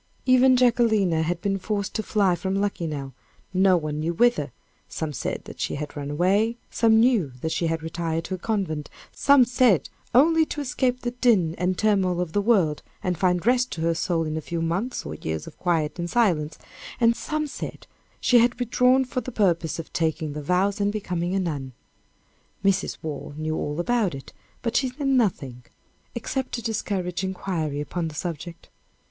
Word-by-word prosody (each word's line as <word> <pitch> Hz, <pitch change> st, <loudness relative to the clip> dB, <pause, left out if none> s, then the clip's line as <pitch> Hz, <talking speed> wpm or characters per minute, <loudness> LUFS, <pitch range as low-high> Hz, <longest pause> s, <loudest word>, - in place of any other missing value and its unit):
Even 255 Hz, 0 st, +5 dB
Jacquelina 220 Hz, -9 st, +3 dB
had 170 Hz, +2 st, -1 dB
been 195 Hz, -1 st, 0 dB
forced 200 Hz, 0 st, -2 dB
to 220 Hz, -, -1 dB
fly 205 Hz, -4 st, +2 dB
from 190 Hz, +3 st, -2 dB
Luckenough; 160 Hz, -9 st, -2 dB, 0.4 s
no 185 Hz, 0 st, +4 dB
one 150 Hz, -2 st, -3 dB
knew 165 Hz, +2 st, -1 dB
wither; 165 Hz, -, +2 dB, 0.4 s
some 155 Hz, -2 st, -4 dB
said -, -, -3 dB
that -, -, -11 dB
she -, -, -2 dB
had 150 Hz, 0 st, -6 dB
run 145 Hz, -1 st, -5 dB
away; 195 Hz, +9 st, +2 dB
some 225 Hz, -1 st, +4 dB
knew 225 Hz, -, +3 dB
that 160 Hz, -, -2 dB
she 170 Hz, -, 0 dB
had 160 Hz, -1 st, -2 dB
retired 165 Hz, 0 st, -2 dB
to 190 Hz, -, -5 dB
a 185 Hz, -, -4 dB
convent; 175 Hz, -9 st, -2 dB, 0.2 s
some 280 Hz, -2 st, +5 dB
said 240 Hz, -, +3 dB, 0.3 s
only 320 Hz, +5 st, +6 dB
to 305 Hz, -, -5 dB
escape 255 Hz, -2 st, 0 dB
the 240 Hz, -, -2 dB
din 230 Hz, -10 st, +2 dB
and 180 Hz, +1 st, 0 dB
turmoil 195 Hz, -5 st, +2 dB
of 180 Hz, -3 st, -3 dB
the 205 Hz, -, +2 dB
world, 190 Hz, -9 st, +2 dB, 0.2 s
and 180 Hz, -1 st, 0 dB
find 180 Hz, -1 st, +1 dB
rest 250 Hz, +1 st, +3 dB
to 160 Hz, -, -5 dB
her 165 Hz, +1 st, +2 dB
soul 165 Hz, 0 st, 0 dB
in 155 Hz, -1 st, -3 dB
a 160 Hz, -, -2 dB
few 170 Hz, +2 st, -4 dB
months 180 Hz, +10 st, -2 dB
or 75 Hz, -, -5 dB
years 80 Hz, 0 st, -4 dB
of -, -, -12 dB
quiet 165 Hz, -3 st, 0 dB
and 170 Hz, 0 st, -2 dB
silence, 170 Hz, -10 st, +1 dB, 0.4 s
and 235 Hz, -1 st, +4 dB
some 305 Hz, +4 st, -2 dB
said 290 Hz, -, -7 dB, 0.3 s
she 245 Hz, -, +5 dB
had 240 Hz, +1 st, +3 dB
withdrawn 250 Hz, +2 st, +3 dB
for 255 Hz, 0 st, -3 dB
the 255 Hz, -, -7 dB
purpose 175 Hz, -7 st, +1 dB
of 165 Hz, -, -8 dB
taking 160 Hz, -2 st, -1 dB
the 150 Hz, -, -5 dB
vows 190 Hz, +6 st, +1 dB
and 200 Hz, 0 st, +2 dB
becoming 180 Hz, -3 st, -2 dB
a -, -, +2 dB
nun. 145 Hz, -8 st, -3 dB, 0.9 s
Mrs. 195 Hz, -1 st, +1 dB
Waugh 145 Hz, -2 st, -5 dB
knew 155 Hz, 0 st, -2 dB
all 150 Hz, +1 st, -3 dB
about 210 Hz, -, +1 dB
it, 135 Hz, -, -10 dB, 0.3 s
but 230 Hz, -, -2 dB
she 265 Hz, -, +2 dB
said 275 Hz, +3 st, -4 dB
nothing, 165 Hz, -, 0 dB, 0.5 s
except 260 Hz, +2 st, -3 dB
to 235 Hz, -, -3 dB
discourage 195 Hz, -5 st, -2 dB
inquiry 180 Hz, -6 st, -2 dB
upon 165 Hz, +3 st, -3 dB
the 155 Hz, -, -8 dB
subject. 170 Hz, +1 st, -6 dB
185 Hz, 190 wpm, -25 LUFS, 160-230 Hz, 0.9 s, only